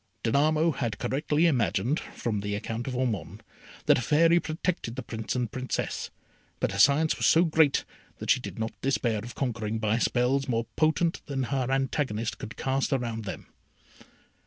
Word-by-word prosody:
Danamo 155 +7 +3
had 120 -7 -3
correctly 150 +7 +1
imagined, 125 - +1
from 110 -3 -4
the 100 0 -2
account 115 +3 -4
of 130 - -3
Ormond, 120 -9 -2 0.4
that - - +5
a - - -2
Fairy 165 +7 +4
protected 160 -7 -3
the 130 - -5
Prince 110 0 -4
and 120 -3 -1
Princess; 130 0 -3 0.5
but - - 0
her 100 - -4
science 145 +8 +5
was - - +2
so 165 - +6
great, 155 -3 +3 0.3
that - - 0
she - - +4
did - - -7
not 110 0 -2
despair 120 -5 +1
of 120 +3 -8
conquering, 115 -4 -2
by 110 +1 +1
spells 130 +3 +1
more 115 -2 0
potent 160 +2 +1
than 135 -2 -1
her 130 0 -1
antagonist 135 -4 -1
could 110 - -8
cast 135 +2 0
around 115 -5 -2
them. 95 - -6
130 Hz, 170 wpm, -28 LUFS, 115-145 Hz, 0.5 s, so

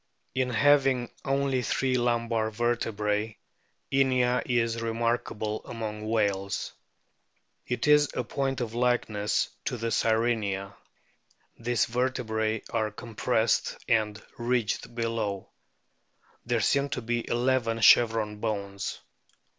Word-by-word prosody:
In 130 -1 0
having 130 0 +3
only 135 -1 +1
three 130 +2 0
lumbar 115 -2 +1
vertebrae 110 -2 -1 0.5
Inia 130 -2 +3
is 115 -2 +1
remarkable 115 -2 -1
among 110 -2 -5
whales. 100 -3 0 0.9
It 125 +4 -1
is 150 -1 +6
a 125 - 0
point 135 +1 -2
of 115 -2 -3
likeness 115 -4 +1 0.2
to 125 - -2
the 115 0 -2
Sirenia. 110 -4 0 0.9
These 120 0 +1
vertebrae 115 -3 -1
are 110 -1 +1
compressed 110 +1 0
and 110 -2 +1 0.2
ridged 120 -1 -1
below. 115 -4 -2 1.0
There 120 -2 +1
seem 140 +6 +2
to - - -2
be 120 0 -2
eleven 120 -2 +1
chevron 110 -2 +5
bones. 100 -2 -3
115 Hz, 105 wpm, -28 LUFS, 110-125 Hz, 1.0 s, is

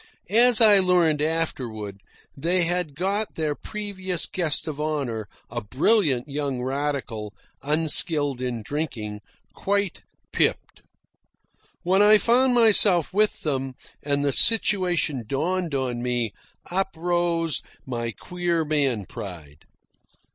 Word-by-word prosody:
As 240 +1 +6
I 210 -3 +7
learned 175 -5 +2
afterward, 120 -11 -3 0.4
they 175 +5 +2
had 175 -4 -1
got 195 +5 -2
their 155 -2 -1
previous 190 -1 -4
guest 165 -5 -1
of 150 -1 -4
honour, 135 -9 -3 0.2
a 120 0 -3
brilliant 135 - +1
young 140 -2 -3
radical, 130 -6 -3 0.3
unskilled 150 -2 +2
in 120 -3 -3
drinking, 115 -8 -4 0.3
quite 200 -2 -2 0.3
pipped. - - -1 1.0
When 190 +3 +3
I 210 +1 +7
found 245 +3 +2
myself 205 -7 +4
with 210 +2 +1
them, 135 -3 -3 0.3
and 145 0 -1
the 140 - +2
situation 180 - +2
dawned 165 +4 -2
on 125 -3 -2
me, 120 -3 -2 0.4
up 190 +2 0
rose 170 -1 0 0.2
my 120 -2 -3
queer 175 +4 -2
man 140 -9 0
pride. 80 -7 -10
155 Hz, 115 wpm, -24 LUFS, 130-185 Hz, 1.0 s, I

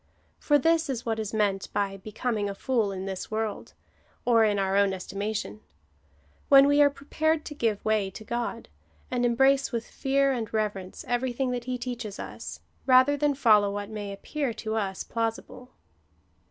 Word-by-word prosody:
For 295 - +3
this 325 +1 +2
is 245 -3 -3
what 225 -1 -1
is 215 -1 -3
meant 205 -3 0
by 195 -1 -1
becoming 210 +1 -2
afoot 215 +2 0
in 190 - -5
this 190 -1 -5
world, 220 -1 -3 0.5
or 230 -2 +5
in 210 -2 +2
our 195 0 0
own 200 -1 +3
estimation 205 +3 -4 0.5
— - - -35
when 275 -1 +8
we 285 +1 +4
are 290 - +7
prepared 305 +3 -1
to 295 - -6
give 225 -7 -1
way 215 -3 +1
to 190 - -10
God, 235 0 -4 0.4
and 245 -1 0
embrace 270 +3 +3
with 230 -2 -2
fear 275 0 +1
and 230 -5 -3
reverence 205 -4 -3
everything 250 +1 -1
that 245 -1 -3
he 255 0 -2
teaches 240 -4 -5
us, - - -7 0.3
rather 260 +2 +6
than 290 0 +1
follow 215 -6 +5
what 205 +1 -5
may 205 -2 -5
appear 245 +5 -3
to 220 -1 -4
us 195 -4 -2
plausible. 230 +2 -4
230 Hz, 170 wpm, -27 LUFS, 205-265 Hz, 0.5 s, when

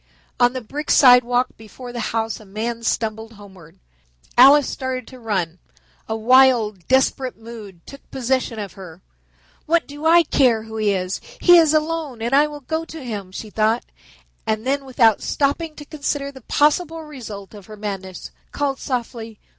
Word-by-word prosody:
On 245 0 +4
the 255 - -4
brick 290 +7 -7
sidewalk 250 -1 +5
before 240 +3 -11
the 240 - -5
house 225 -1 -2
a - - -14
man 225 +4 -4
stumbled 220 0 -2
homeward. 190 -6 -15 0.6
Alice 275 +3 +7
started 260 -2 -4
to 255 - -13
run. 185 -7 -2 0.5
A 220 - -1
wild, 230 -5 +3
desperate 260 -1 +1
mood 220 -6 -11
took 275 - -14
possession 260 -2 -1
of 205 -2 -6
her. 185 -2 -12 0.6
"What 335 +1 +2
do 290 +2 -4
I 340 +1 +6
care 250 -7 +2
who 220 0 -7
it 215 - 0
is. 185 -1 -1 0.2
He 350 - +7
is 320 -2 +4
alone, 310 -5 -1
and 235 +3 -3
I 290 +2 +5
will 295 -1 -9
go 320 +4 -3
to 320 -3 -9
him," 205 -5 -6
she 210 +2 -8
thought; 220 +3 +1 0.6
and 220 +1 -1
then 275 +1 -1
without 230 -5 +3
stopping 305 +3 -1
to 295 - -10
consider 285 -2 -3
the 265 -1 -13
possible 315 +5 +1
result 225 -10 -9
of 205 -3 -13
her 215 -1 -11
madness, 195 -3 -6 0.2
called 280 -2 -2
softly. 230 -4 -5
245 Hz, 170 wpm, -21 LUFS, 215-280 Hz, 0.6 s, Alice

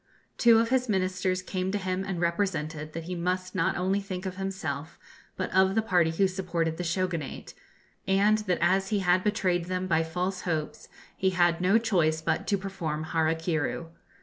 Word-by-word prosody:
Two 235 -1 +7
of 230 0 +2
his 255 -1 +1
Ministers 185 -1 0
came 185 0 -2
to 205 - 0
him 185 -1 -2
and 190 -3 -3
represented 165 -4 -1
that 165 - -5
he 180 +3 -5
must 180 +1 -2
not 165 -3 +1
only 190 +3 +1
think 190 -1 -6
of 185 -1 -4
himself, 165 -7 -4 0.4
but 185 - -3
of 190 +1 +4
the 220 - +3
party 175 -6 +3
who 190 +4 +2
supported 170 -4 -2
the 180 - -3
Shogunate, 170 -4 -3 0.5
and 200 +3 +4
that 185 -5 0
as 190 +3 +3
he 205 -2 +1
had 180 0 +3
betrayed 185 -5 +1
them 185 +1 -2
by 165 -3 +2
false 180 +3 -2
hopes 160 -4 -3 0.3
he 190 - +1
had 175 -2 +2
no 190 +4 +4
choice 175 -9 +2
but 160 0 -1
to 200 - +2
perform 170 -6 -4
Hara 160 0 +2
kiru. 165 0 -2
185 Hz, 185 wpm, -28 LUFS, 165-195 Hz, 0.5 s, Two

